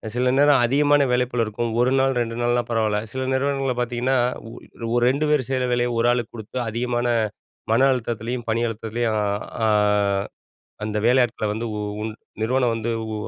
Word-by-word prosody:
சில 125 +1 +2
நேரம் 145 -3 +5
அதிகமான 145 +3 +3
வேலை 125 0 +2
பளு 120 -1 +1
இருக்கும். 115 +2 -3
1 125 +1 +3
நாள், 135 0 +2
2 115 -1 -2
நாள்னா 120 0 +2
பரவால்ல. 110 -2 +1
சில 130 0 -3
நிறுவனங்கள்ல 135 -1 0
பார்த்தீங்கன்னா, 125 +2 0 0.3
ஒர் 115 - -10
ஒரு 120 - +2
2 140 +4 0
பேரு 150 -3 +3
செய்யிற 130 -1 0
வேலைய 120 0 +1
ஒரு 115 +1 +2
ஆளுக்கு 120 -2 -1
குடுத்து, 110 +3 -8
அதிகமான 120 +1 -1 0.6
மன 130 +4 +5
அழுத்தத்துலயும், 120 0 -4
பணி 115 +1 +1
அழுத்தத்துலயும் 115 0 -2
அ - - 0 0.4
ஆ, - - +3 1.2
அந்த 105 0 -2
வேலையாட்கள 120 -3 +2
வந்து 115 +2 -3
உ - - -3 0.2
உன் 110 0 -3 0.3
நிறுவனம் 125 +1 +1
வந்து 115 +1 -3 0.2
உ - - -3
120 Hz, 170 wpm, -23 LUFS, 115-130 Hz, 1.2 s, நேரம்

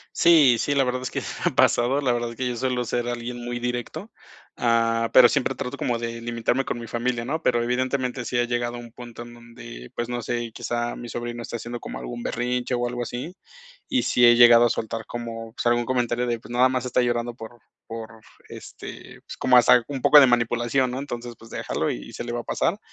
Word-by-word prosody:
Sí, 150 -8 +6
sí, 145 - 0
la 135 -1 +3
verdad 125 0 -2
es 130 - -4
que - - -3
me - - -8 0.2
ha - - +1
pasado, 130 +4 +3
la 125 -2 +2
verdad 120 0 -1
es - - -13
que 130 +1 -2
yo 125 - -1
suelo 125 0 -1
ser 120 +1 -2
alguien 120 0 -5
muy 120 0 -4
directo, 120 -1 -4 0.5
ah, 115 -1 +2
pero 125 -1 +9
siempre 135 - 0
trato 125 +2 -5
como 120 -2 -1
de 115 0 -5
limitarme 120 +3 -1
con 120 - -3
mi 115 - -7
familia, 120 +1 -2
¿no? 155 +6 -3
Pero 120 - +2
evidentemente 125 0 -1
sí 125 - -2
ha 120 - +3
llegado 120 0 -2
a - - -7
un 120 -1 -11
punto 120 -1 -10
en 120 0 -11
donde, 120 - -12
pues 120 0 -3
no 120 0 -2
sé, 120 -1 -3
quizá 120 +1 -3
mi 120 - -8
sobrino 120 0 -5
está 120 - -5
haciendo 120 +1 -6
como - - -7
algún 120 -1 -7
berrinche 125 +1 -2
o 120 0 0
algo 120 0 -4
así, 125 +9 -5 0.6
y 260 -2 +1
sí 125 - +4
he 120 - +7
llegado 120 0 +8
a - - +3
soltar 110 0 -3
como 115 -1 -6
pues - - -5
algún 120 0 +3
comentario 125 -1 0
de: 120 -1 -2
"Pues 120 - -11
nada 125 +1 +4
más 130 -1 -2
está 125 0 +1
llorando 120 0 -1
por 115 +1 -11 0.3
por 115 -1 -9 0.3
este - - -10
pues, - - -7
como 125 -1 +4
hasta 120 0 +6
un 135 -3 -4
poco 150 -1 +8
de 135 - +7
manipulación, 120 +2 +1
¿no? 130 - -4
Entonces 120 -4 -6
pues 115 - -16
déjalo - - -2
y - - -8
se - - -5
le 120 - -5
va 120 - -2
a - - -6
pasar". - - -1
120 Hz, 235 wpm, -24 LUFS, 120-125 Hz, 0.6 s, pero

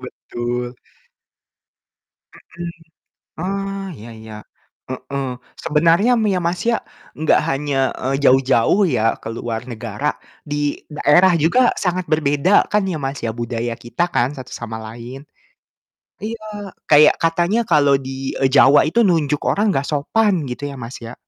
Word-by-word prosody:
Betul. 120 +1 -5 1.6
Mhm, 170 0 -9 0.7
oh, 195 +1 -3 0.2
iya 110 +1 -11
iya, 110 -1 -10 0.6
heeh, 135 +2 -4 0.4
sebenarnya 165 +9 +3
m 220 - +1
ya, - - +1
Mas, 175 +1 -1
ya, 230 - +2 0.5
gak - - +5
hanya, 140 0 -1 0.3
eee, 135 +2 0
jauh-jauh 130 - +4
ya 110 - 0 0.2
ke - - -6
luar 115 -1 -4
negara, 115 +4 -5 0.4
di 145 - -1 0.4
daerah 175 +6 +5
juga 175 +11 +3 0.2
sangat 180 0 0
berbeda 155 +5 +3
kan 210 0 +3
ya, 160 - -3
Mas, 135 +1 -3
ya, 115 - 0
budaya 120 0 -3
kita 120 +8 -2
kan 120 - +3
satu 130 - -9
sama 115 -1 -6
lain. 120 +4 -9 1.0
Iya, 225 +1 -5 0.5
kayak 150 0 +7
katanya 170 +6 +2
kalau 145 -3 +5
di 135 0 -8 0.3
e - - +5
Jawa 140 +1 +7
itu 200 - -1
nunjuk 150 -4 +1
orang 210 +2 +1
gak 135 +1 -1
sopan 195 +8 +1 0.2
gitu, 125 +3 -6
ya, - - -8
Mas, 115 +3 -7
ya. 115 - -8
145 Hz, 140 wpm, -19 LUFS, 120-175 Hz, 1.6 s, kayak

